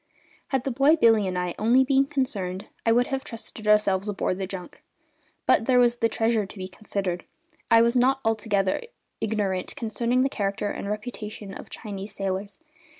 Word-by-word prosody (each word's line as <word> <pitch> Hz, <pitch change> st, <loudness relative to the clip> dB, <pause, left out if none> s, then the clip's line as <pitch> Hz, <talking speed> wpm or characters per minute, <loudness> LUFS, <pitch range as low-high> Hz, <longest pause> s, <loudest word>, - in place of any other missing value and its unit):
Had 265 Hz, -2 st, 0 dB
the 270 Hz, -, -1 dB
boy 275 Hz, +6 st, +5 dB
Billy 225 Hz, -9 st, +4 dB
and 185 Hz, -1 st, -2 dB
I 180 Hz, -1 st, -1 dB
only 240 Hz, +5 st, +5 dB
been 270 Hz, +1 st, +3 dB
concerned 200 Hz, -10 st, -2 dB, 0.2 s
I -, -, +6 dB
would 245 Hz, +2 st, +4 dB
have 270 Hz, 0 st, -1 dB
trusted 225 Hz, -2 st, -8 dB
ourselves 210 Hz, -1 st, +3 dB
aboard 195 Hz, -2 st, -1 dB
the 190 Hz, -, -2 dB
junk; 180 Hz, -2 st, -8 dB, 0.6 s
but 225 Hz, -, +4 dB
there 255 Hz, -1 st, +4 dB
was 240 Hz, -1 st, +4 dB
the 230 Hz, -1 st, +2 dB
treasure 225 Hz, -1 st, +1 dB
to 205 Hz, -, -12 dB
be 185 Hz, -1 st, -5 dB
considered, 190 Hz, -2 st, -3 dB, 0.3 s
and -, -, -33 dB
I 230 Hz, -1 st, +7 dB
was 235 Hz, +1 st, +2 dB
not 260 Hz, +2 st, +3 dB
altogether 210 Hz, -4 st, +1 dB, 0.4 s
ignorant 205 Hz, -4 st, -1 dB
concerning 240 Hz, 0 st, 0 dB
the -, -, +3 dB
character 205 Hz, -4 st, -2 dB
and 200 Hz, -, -5 dB
reputation 210 Hz, -2 st, -6 dB
of -, -, -9 dB
Chinese 200 Hz, -1 st, -7 dB
sailors. 195 Hz, +1 st, -3 dB
215 Hz, 180 wpm, -26 LUFS, 195-245 Hz, 0.6 s, I